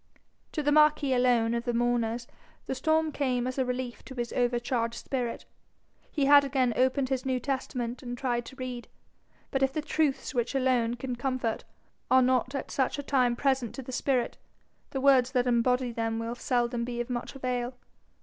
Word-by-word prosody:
To 305 - -1
the 290 - +2
marquis 300 -2 +4
alone 245 -2 +3
of 235 0 -2
the 240 - -1
mourners 240 0 0 0.4
the - - -2
storm 315 +3 +1
came 255 -4 0
as 255 +1 -3
a 260 - +2
relief 250 -1 -4
to 265 - -9
his 240 -1 -3
overcharged 240 -1 0
spirit. 245 -3 -3 0.6
He 285 -3 0
had 285 0 +8
again 260 -3 +1
opened 260 +1 +2
his 260 -1 -1
New 260 -1 0
Testament, 250 -2 -3
and 245 -2 -6
tried 240 -2 -1
to 265 - -10
read; 255 -2 -6 0.6
but 270 - 0
if 270 0 +3
the 310 - -2
truths 300 -3 0
which 240 +1 -1
alone 250 -3 +2
can 250 0 -4
comfort 250 -3 -2 0.4
are 260 0 +6
not 255 +1 +1
at 275 - -4
such 265 +1 0
a 285 - -4
time 255 -4 +2
present 265 -3 0
to 270 - -6
the 260 - -8
spirit, 255 -1 0 0.5
the 270 - -3
words 260 -2 +4
that 250 -2 +2
embody 250 +1 +2
them 225 -1 -2
will 230 +1 -3
seldom 240 -1 0
be 240 0 -4
of 240 - -2
much 240 +2 -4
avail. 250 -1 -2
255 Hz, 190 wpm, -28 LUFS, 240-270 Hz, 0.6 s, had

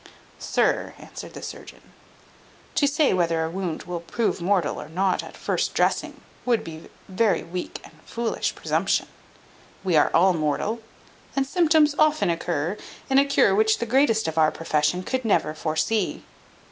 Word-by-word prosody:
"Sir," - - 0
answered - - -10
the - - -8
surgeon, - - -10 0.8
"to 285 - +3
say 285 +1 +2
whether 165 -3 +1
a 160 - -4
wound 180 -3 -4
will 175 0 -4
prove 180 +3 -2
mortal 185 -2 0
or - - -10
not 185 +3 +1
at - - -11
first - - -1
dressing, - - 0 0.2
would 240 -3 +1
be 160 0 -10 0.2
very 200 +2 +1
weak 180 +1 -6
and - - -14
foolish 230 -1 -2
presumption: - - 0 0.8
we 185 -3 +1
are 150 - +5
all 185 +2 +4
mortal, 165 +8 -1 0.6
and 275 -1 +1
symptoms 310 -1 +3
often 310 - +3
occur 170 +2 -2 0.3
in 265 - +6
a 280 - +4
cure 280 -8 +3
which 220 +2 +3
the 235 - -2
greatest 235 - +2
of 160 0 -1
our 155 -1 +5
profession 155 +3 0
could 260 +6 -2
never 175 -8 +1
foresee." 165 +6 -1
190 Hz, 160 wpm, -24 LUFS, 165-235 Hz, 0.8 s, in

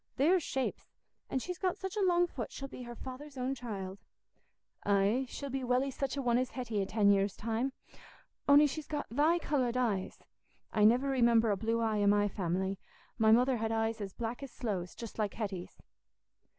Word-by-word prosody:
"There's 340 +7 +4
shapes! 265 -3 -3 0.4
An' - - -1
she's 360 +7 -4
got 370 -2 0
such 385 +1 -5
a 420 - 0
long 350 -2 +4
foot, 255 -10 -6
she'll 275 - -6
be 265 - -9
her 240 -1 -7
father's 265 +3 -9
own 255 +1 -1
child." 200 -7 -6 0.8
"Aye, 205 +6 +2
she'll 280 -2 -6
be 265 0 -2
welly 255 +2 +1
such 275 +1 -3
a 275 - -1
one 240 0 +3
as 255 0 -1
Hetty 235 -5 -2
i' - - 0
ten 200 0 +3
years' 195 0 +1
time, 230 +4 -1 0.8
on'y 290 +1 +8
she's 295 +1 -3
got 295 -1 -3
thy 305 +7 +3
coloured 260 -7 0
eyes. 215 -7 0 0.6
I 210 -1 +4
niver 245 +5 +5
remember 235 -4 +4
a - - +2
blue 225 +3 0
eye 220 -2 +1
i' 205 - +3
my 205 0 +4
family; 190 0 -2 0.4
my 220 -1 +5
mother 250 +3 +4
had 225 0 -1
eyes 225 0 0
as 195 -1 -4
black 235 +5 -4
as 275 - -6
sloes, 190 -7 -3
just 230 -1 -8
like 210 -2 -1
Hetty's." 195 -5 -5
240 Hz, 195 wpm, -32 LUFS, 210-270 Hz, 0.8 s, on'y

